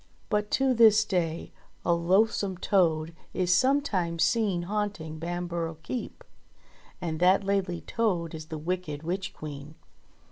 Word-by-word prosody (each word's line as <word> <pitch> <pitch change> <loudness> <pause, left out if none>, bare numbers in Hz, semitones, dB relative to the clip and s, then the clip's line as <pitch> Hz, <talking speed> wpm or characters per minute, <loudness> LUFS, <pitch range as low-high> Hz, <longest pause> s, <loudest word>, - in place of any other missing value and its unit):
But 210 0 0
to 270 -1 +3
this 220 -2 +6
day 170 -4 -2 0.3
a 170 - +4
loathsome 190 +3 +2
toad 165 -4 +1 0.2
is 180 -1 +2
sometimes 190 - +2
seen 190 0 +1
haunt 205 +1 -2
ing 160 0 -7
Bamborough 170 -1 -3
Keep; 245 +6 -5 0.8
and 165 -3 -3
that 185 +3 +4
Laidly 195 -3 -1
Toad 180 -8 -1
is 155 -1 -7
the 160 - -5
wicked 160 -2 -3
Witch 185 +3 -3
Queen 150 0 -9
180 Hz, 135 wpm, -28 LUFS, 165-205 Hz, 0.8 s, this